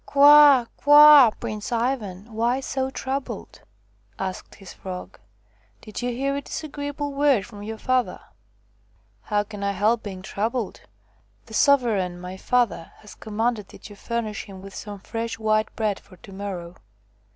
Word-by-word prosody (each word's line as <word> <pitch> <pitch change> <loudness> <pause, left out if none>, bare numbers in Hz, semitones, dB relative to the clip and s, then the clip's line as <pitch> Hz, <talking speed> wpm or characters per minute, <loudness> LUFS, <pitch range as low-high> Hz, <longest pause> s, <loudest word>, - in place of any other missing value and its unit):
"Kwa! 285 -3 +7
kwa! 295 -3 +8
Prince 210 +1 -5
Ivan, 230 -4 -2
why 235 +4 +1
so 265 0 -2
troubled 265 -4 -5
V' - - -28 0.6
asked 190 -1 -6
his 195 -3 -12
Frog. 185 -1 -8 0.3
" 105 +1 -37
Did 215 0 -7
you 245 - -1
hear 275 +3 -2
a 280 - -3
disagreeable 285 -1 -5
word 275 -8 +2
from 205 -2 -12
your 220 +2 -6
father? 255 +1 0 0.4
" - - -39
" - - -38
How 205 -1 +2
can 205 -1 -9
I 200 0 0
help 215 +4 +1
being 190 -3 -8
troubled? 220 +3 -3 0.6
The 225 - -14
sovereign, 220 -10 +2
my 180 +1 -7
father, 235 -4 0
has 210 - -14
commanded 220 -1 -2
that 210 - -13
you - - -11
furnish 220 0 -4
him 190 -2 -11
with 195 0 -10
some 205 -1 -7
fresh 225 +2 -4
white 215 -1 +1
bread 215 -3 -1
for 185 - -19
to 195 - -15
morrow." 185 -3 -6
220 Hz, 160 wpm, -24 LUFS, 200-260 Hz, 0.6 s, kwa